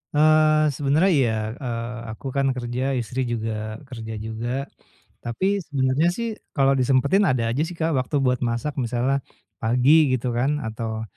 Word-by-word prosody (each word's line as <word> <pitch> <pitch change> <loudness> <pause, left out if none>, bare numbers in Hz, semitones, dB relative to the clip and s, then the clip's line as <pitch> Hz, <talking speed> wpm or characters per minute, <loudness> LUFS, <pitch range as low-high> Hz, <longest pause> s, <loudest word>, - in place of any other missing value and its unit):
Eee, 155 0 +5
sebenernya 145 +6 +2
iya, 125 -5 +3 0.2
eee, 120 -2 -4
aku 110 - -11
kan 135 -1 +2
kerja 125 0 -3 0.2
istri 120 +2 -4
juga 110 -1 -3
kerja 115 -3 -7
juga, 110 +2 -4 0.7
tapi 190 +13 -1
sebenarnya 135 +2 +1
sih 235 0 -2 0.3
kalau 135 -1 +4
disempetin 140 +10 +3
ada 125 -5 +1
aja 125 - -2
sih 175 - -8
Kak, 165 0 0
waktu 130 +4 -3
buat 125 -1 +2
masak 120 +4 -2
misalnya, 125 +3 0 0.4
pagi 125 +4 +3 0.2
gitu 125 0 -2
kan 145 +4 0
atau, 110 0 -4
130 Hz, 150 wpm, -23 LUFS, 115-145 Hz, 0.7 s, Eee